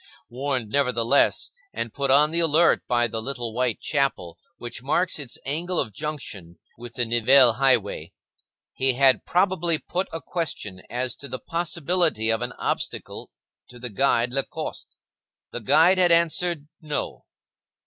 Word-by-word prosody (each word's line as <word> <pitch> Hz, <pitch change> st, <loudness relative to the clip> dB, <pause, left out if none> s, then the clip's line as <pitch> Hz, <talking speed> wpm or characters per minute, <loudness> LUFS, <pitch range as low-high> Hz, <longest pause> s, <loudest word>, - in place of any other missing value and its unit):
Warned, 130 Hz, -3 st, -2 dB
nevertheless, 125 Hz, -1 st, +2 dB, 0.2 s
and 115 Hz, -2 st, -4 dB
put 140 Hz, -1 st, -2 dB
on 145 Hz, +3 st, +5 dB
the 170 Hz, -, 0 dB
alert 165 Hz, +1 st, +3 dB
by 120 Hz, -1 st, +2 dB
the 115 Hz, -1 st, -3 dB
little 120 Hz, -2 st, -4 dB
white 125 Hz, -1 st, -1 dB
chapel 135 Hz, -, -1 dB, 0.2 s
which 120 Hz, -1 st, -7 dB
marks 155 Hz, +6 st, 0 dB
its 135 Hz, -5 st, -3 dB
angle 170 Hz, +6 st, -2 dB
of 110 Hz, -, -2 dB
junction 105 Hz, -, -7 dB, 0.2 s
with 120 Hz, 0 st, -11 dB
the 125 Hz, -, 0 dB
Nivelles 120 Hz, +1 st, +5 dB
highway, 130 Hz, -6 st, +1 dB, 0.6 s
he 130 Hz, 0 st, +2 dB
had 130 Hz, +1 st, +3 dB
probably 175 Hz, -3 st, +1 dB
put 180 Hz, +4 st, -3 dB
a 165 Hz, -, -4 dB
question 130 Hz, -, -4 dB
as 125 Hz, +1 st, -2 dB
to 140 Hz, -, -8 dB
the 130 Hz, 0 st, -5 dB
possibility 165 Hz, -5 st, 0 dB
of 115 Hz, -, -1 dB
an 125 Hz, 0 st, -3 dB
obstacle, -, -, -4 dB, 0.4 s
to 125 Hz, -, -12 dB
the 120 Hz, -1 st, -6 dB
guide 120 Hz, +1 st, +1 dB
Lacoste. 135 Hz, 0 st, -4 dB, 0.6 s
The 120 Hz, -, -5 dB
guide 160 Hz, -, +4 dB
had 175 Hz, -1 st, +4 dB
answered 170 Hz, -2 st, +2 dB
No. 150 Hz, -2 st, -4 dB
135 Hz, 150 wpm, -24 LUFS, 120-160 Hz, 0.6 s, on